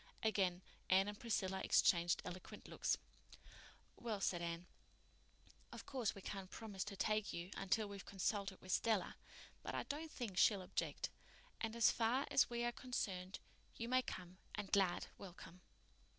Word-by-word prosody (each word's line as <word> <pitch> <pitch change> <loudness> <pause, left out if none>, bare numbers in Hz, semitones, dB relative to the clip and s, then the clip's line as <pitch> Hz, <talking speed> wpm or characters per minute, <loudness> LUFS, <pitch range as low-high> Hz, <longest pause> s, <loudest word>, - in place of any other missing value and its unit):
Again 190 -4 +2 0.3
Anne 190 +2 +6
and 205 0 -4
Priscilla 190 -5 0
exchanged 175 0 +4
eloquent 180 +1 -7
looks. - - +1 1.0
"Well," 225 -4 -2
said 175 -3 +1
Anne, 170 +1 -3 1.1
"of - - -8
course 250 -6 -1
we 195 - -9
can't 195 -2 -4
promise 205 -4 -4
to 205 -1 -5
take 215 +1 +1
you 175 +2 -4
until 210 +2 +1
we've 200 -1 -7
consulted 195 0 -1
with 185 - -4
Stella; 220 -1 +2 0.5
but - - -4
I - - 0
don't 310 +3 -4
think 210 -7 -2
she'll 200 -4 +6
object, - - -2 0.5
and, 225 0 -2
as 235 -2 +6
far 240 +4 +2
as - - +5
we 240 0 -1
are 240 - +2
concerned, 195 -8 -2 0.4
you 230 - -3
may 255 +1 +4
come 185 -5 -6 0.2
and 210 -2 -4
glad 190 -3 +3
welcome." 180 -1 -10
200 Hz, 155 wpm, -41 LUFS, 185-225 Hz, 1.1 s, Anne